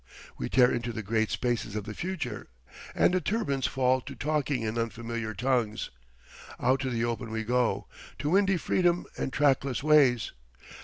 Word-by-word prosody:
We - - -4
tear 125 -1 +5
into 120 0 -2
the 110 -1 -5
great 110 +2 0
spaces 120 -4 -1
of 105 - -2
the 105 - -6
future 185 - -4 0.5
and - - +4
the 185 - +2
turbines 180 - 0
fall 130 0 +2
to 140 +1 -9
talking 145 -4 -1
in 110 +1 -2
unfamiliar 115 -1 -3
tongues. 120 -2 0 0.7
Out 130 +2 +2
to 130 -1 -2
the 115 -1 0
open 120 0 -3
we 110 0 -3
go, 125 +1 +1 0.3
to 150 - -2
windy 195 0 +4
freedom 175 0 +1
and - - -3
trackless 135 -2 +1
ways. 140 -6 +4
125 Hz, 165 wpm, -28 LUFS, 115-145 Hz, 0.7 s, tear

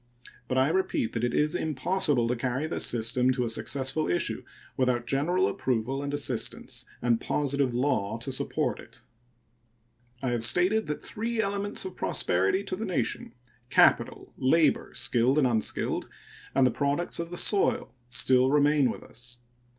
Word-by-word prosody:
But 130 - -1
I 130 +2 +3
repeat 175 -10 -1
that 115 - -3
it 120 - +1
is 150 +1 +1
impossible 150 -3 +1
to 125 - 0
carry 130 +4 -2
this - - +1
system 125 +2 +1
to 125 -1 -1
a - - -2
successful 135 +6 0
issue 85 - -1 0.3
without 125 -2 0
general 160 +9 +1
approval 130 +2 -2
and 140 0 -4
assistance 140 -5 -2 0.2
and 120 -2 +2
positive 140 -3 -1
law 125 -5 0
to 120 +4 -5
support 130 - -1
it. - - -14 1.2
I 130 - 0
have 120 -2 0
stated 180 - +3
that 150 - -4
three 230 +1 -3
elements 200 -1 -1
of 185 -1 -7
prosperity 95 - +1
to 195 - -4
the 215 - -5
nation 135 - -2 0.4
capital, - - +2
labor, 155 +5 +2
skilled 125 +4 +2
and 150 - +4
unskilled, 115 -3 -1 0.5
and 130 -2 +3
products 145 +5 -1
of 170 0 -4
the 175 - -6
soil 195 - +2 0.2
still 125 +1 +3
remain 145 -1 +3
with - - -6
us. 120 0 -9
135 Hz, 155 wpm, -27 LUFS, 120-160 Hz, 1.2 s, and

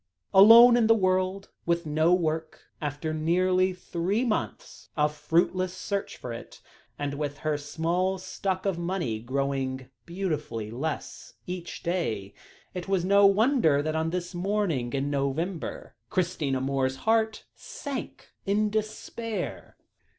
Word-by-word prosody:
Alone 230 +5 +9
in 230 -2 +3
the 225 - +6
world, 185 -1 0 0.2
with 170 0 +1
no 155 +2 +2
work, 160 -3 0 0.2
after 150 +1 -3
nearly 185 +4 +2
three 180 +5 -2
months 220 -3 -4
of 150 0 +2
fruitless 175 +4 +1
search 200 +2 -3
for 120 - -6
it, 115 - -10 0.4
and 145 -1 -3
with 145 -1 -3
her 155 -1 +2
small 170 +6 -1
stock 185 0 -3
of 190 -4 0
money 170 - -2
growing 130 +1 -2 0.2
beautifully 155 - -3
less 145 +6 -5
each 180 -1 -6
day, 115 - -2 0.4
it 180 0 -5
was 190 -3 +1
no 200 +1 +6
wonder 200 - +3
that 155 +1 -2
on 160 +1 0
this 180 +1 -4
morning 175 -9 -1
in 140 +1 -1
November, 145 +6 -3 0.2
Christina 165 -8 0
Moore's 130 0 0
heart 220 -1 +1
sank 290 - -7
in 210 +1 +1
despair. 215 +1 -4
175 Hz, 130 wpm, -27 LUFS, 145-195 Hz, 0.4 s, Alone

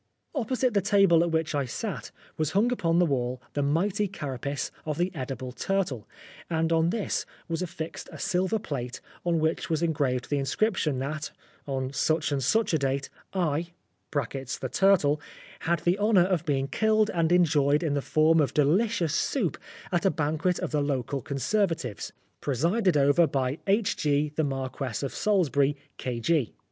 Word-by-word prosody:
Opposite 255 -2 0
the 200 - +3
table 195 -4 +5
at 170 - +1
which 160 -1 0
I 140 -2 0
sat 120 - -4 0.3
was 155 0 -1
hung 215 +6 +3
upon 170 -8 +1
the 175 - +5
wall 125 -4 -1
the 145 - 0
mighty 185 +8 +1
carapace 140 -6 -4
of 150 -1 -3
the 175 +2 0
edible 130 -3 -5
turtle, 160 - -2 0.4
and 165 0 +1
on 165 +1 +3
this 215 +2 -1 0.2
was 165 0 -2
affixed 160 -2 -5
a - - -9
silver 190 +2 0
plate 130 - -5 0.2
on 170 -1 +1
which 160 +1 0
was 160 0 0
engraved 140 -6 0
the 145 - +2
inscription 155 - 0
that, 150 +4 -3 0.4
on 135 -1 -2
such 155 +2 +1
and 140 -1 0
such 220 - +2
a 160 - +3
date, 135 0 -1 0.2
"I" 170 -2 -1 0.4
(the 135 -2 -3
turtle) 170 -7 +4 0.4
"had 170 0 0
the 175 +4 +1
honour 205 -4 +4
of 180 -3 0
being 135 -2 +1
killed 215 +5 +2
and 165 -1 +1
enjoyed 150 -4 +3
in 155 -3 0
the 140 - 0
form 155 +3 +3
of 145 - -1
delicious 170 +3 +2
soup 190 - 0 0.4
at 175 -2 +1
a 195 - +4
banquet 160 +3 0
of - - -3
the 150 -2 +1
local 140 -1 -1
Conservatives, 150 - -1 0.3
presided 170 - +1
over 145 +4 +5
by 135 +1 -1
H.G. 150 -8 +1
the 160 - +1
Marquess 135 -4 -3
of 140 - -3
Salisbury, 145 - +2 0.2
K.G." 125 +2 0
160 Hz, 165 wpm, -27 LUFS, 140-180 Hz, 0.4 s, table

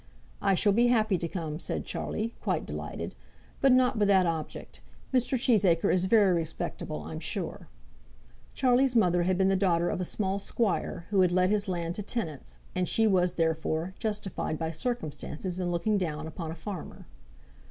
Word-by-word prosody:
"I 195 -1 +3
shall 205 +2 +3
be 240 +3 +4
happy 215 -6 +2
to 170 - -2
come," 160 -3 -4
said - - -3
Charlie, 225 +2 -3
quite - - -1
delighted; - - -5 0.5
"but 275 - +5
not 255 -2 +4
with 205 - +3
that 190 -2 +5
object. 165 -2 -4 0.3
Mr. 255 +1 +2
Cheesacre 200 -9 +3
is 185 0 +2
very 200 -2 +5
respectable, 160 - -3
I'm 80 +1 -6
sure." - - -4 0.9
Charlie's 255 0 +3
mother 180 -6 +4
had 180 +1 +1
been 190 0 +3
the 195 - +3
daughter 175 -3 +2
of - - -2
a - - 0
small 195 +2 -1
squire 200 -4 -1
who 195 -2 +4
had 180 -1 +4
let 185 +1 +3
his 210 0 +1
land 170 -2 -2
to - - -2
tenants, 190 - -4 0.2
and 180 -1 -1
she 225 - +3
was, 180 -4 +3
therefore, 160 +1 -1
justified 205 -7 -3
by 160 0 -2
circumstances 175 - -4
in 180 -1 -1
looking 185 +5 +1
down 155 -4 -3
upon 160 0 -6
a 160 - -5
farmer. 175 +2 -7
185 Hz, 175 wpm, -29 LUFS, 170-210 Hz, 0.9 s, but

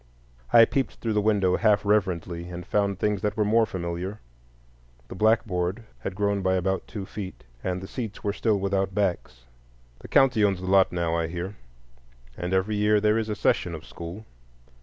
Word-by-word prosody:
I 115 -1 +8
peeped 135 +2 -1
through 115 -2 -2
the 105 - +2
window 100 -4 +2
half 105 -2 +3
reverently, 90 -4 0
and 90 0 -7
found 100 -1 0
things 105 -1 0
that 105 +1 -1
were 105 - +2
more 110 +1 +3
familiar. 90 +2 -4 0.9
The - - -6
blackboard 100 -1 +1 0.2
had 95 - -5
grown 100 0 0
by 95 0 +2
about 95 +1 -1
two 100 -3 -6
feet, 95 -1 -8 0.2
and 90 0 -2
the 95 - -7
seats 115 -1 -6
were 100 -2 0
still 110 -1 +1
without 95 -1 -1
backs. 85 -11 -1 0.6
The - - -11
county 130 -5 +4
owns 100 -3 +2
the 95 - -6
lot 95 0 +4
now, 85 -2 -1
I 85 -1 0
hear, 90 +4 -5 0.8
and 90 +5 -4
every 95 +3 +1
year 105 0 +3
there 105 +1 +3
is 110 -1 -3
a 105 - -1
session 90 -4 +1
of 80 - -10
school. 85 +6 -8
100 Hz, 185 wpm, -26 LUFS, 90-105 Hz, 0.9 s, I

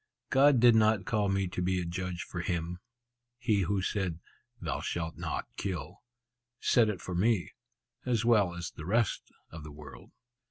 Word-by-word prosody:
God 135 -1 +6
did 120 0 +7
not 110 -2 +3
call 105 -2 +1
me 95 -1 +1
to 90 - -3
be 90 +1 +1
a 90 - -3
judge 90 0 -4
for 90 - -6
Him. 85 0 -2 0.6
He 115 -5 +1
who 95 +1 0
said, 95 -5 -1 0.4
'Thou - - -3
shalt 80 -2 -3
not - - -3
kill,' 90 -1 -4 0.6
said 115 -3 +4
it 100 -4 -3
for 90 - -5
me, 100 +1 +1 0.5
as 120 -3 0
well 105 -7 +4
as 85 -1 -5
the 75 - -9
rest 115 +3 0 0.2
of 80 - -8
the 75 - -9
world." 75 -2 -12
95 Hz, 170 wpm, -30 LUFS, 85-110 Hz, 0.6 s, did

